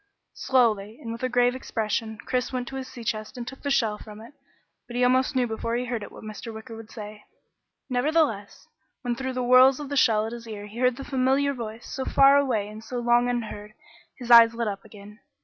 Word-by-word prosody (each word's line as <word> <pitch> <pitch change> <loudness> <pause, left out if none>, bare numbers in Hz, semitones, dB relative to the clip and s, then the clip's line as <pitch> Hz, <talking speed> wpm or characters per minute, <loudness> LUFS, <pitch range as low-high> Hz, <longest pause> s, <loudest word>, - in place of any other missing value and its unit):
Slowly, 225 -4 +1
and 230 - -7
with 230 - -7
a 255 - 0
grave 245 0 +3
expression, 220 -3 -3
Chris 250 -1 -1
went 250 -1 -3
to 270 - -8
his 265 -1 -5
sea 240 - -10
chest 215 +2 -4
and 240 -1 -6
took 270 +1 -9
the 285 - -3
shell 220 -6 +1
from 210 -1 -11
it, 230 +6 -13 0.5
but 240 - -9
he 250 - +1
almost 255 +2 +2
knew 255 -1 +2
before 230 0 -3
he 245 +1 -1
heard 240 -2 -3
it 205 - -8
what - - -12
Mr. 215 +2 -7
Wicker 220 +1 -9
would 225 -1 -11
say. 210 -2 -9 0.6
Nevertheless, 255 -5 0 0.4
when 245 -1 -1
through 260 +1 -4
the 255 0 -2
whorls 255 +2 +6
of 290 -2 -6
the 285 - -3
shell 220 -5 +3
at 225 - -5
his 235 -1 -9
ear 210 -2 -7
he 210 +3 -10
heard 250 -1 +3
the 275 - -6
familiar 270 +2 +1
voice, 230 -2 -7
so 265 - -4
far 275 +1 +5
away 250 -8 +1
and 215 +1 -10
so 245 +2 -6
long 240 0 +3
unheard, 215 -3 -5 0.4
his 245 -1 -5
eyes 230 -1 +8
lit 235 -1 -2
up 200 -1 -4
again. 210 +1 -14
240 Hz, 230 wpm, -25 LUFS, 220-255 Hz, 0.6 s, eyes